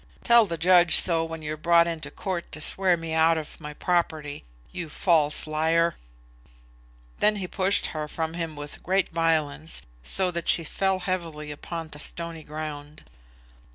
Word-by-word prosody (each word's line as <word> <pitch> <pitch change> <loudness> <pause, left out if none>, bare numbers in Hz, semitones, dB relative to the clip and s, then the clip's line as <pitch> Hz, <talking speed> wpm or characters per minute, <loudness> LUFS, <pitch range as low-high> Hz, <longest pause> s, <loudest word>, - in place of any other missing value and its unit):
Tell 235 -2 +6
the 170 -2 -3
judge 175 0 +5
so, 165 -2 +3
when 165 -1 -6
you're 155 0 -3
brought 170 +2 +4
into 165 -2 -4
court 185 -4 -5
to - - -5
swear 185 +2 +2
me 165 -1 -5
out 160 +1 +4
of 155 +1 -7
my 150 -1 -7
property. 155 -5 -1 0.3
You 175 -3 -6
false 155 -2 +2
liar!" 160 +2 +2 1.3
Then 210 - +3
he 190 -3 -4
pushed 190 +2 +1
her 155 -1 -3
from 160 +1 -3
him 165 -2 -4
with 145 0 -8
great 190 +1 +1
violence, 160 -2 0 0.2
so 180 - +2
that 170 -1 -4
she 165 - +5
fell 190 +4 -1
heavily 165 -5 -4
upon 165 +2 -6
the 150 - -8
stony 170 +1 -3
ground. 150 0 -7
165 Hz, 160 wpm, -26 LUFS, 155-175 Hz, 1.3 s, Tell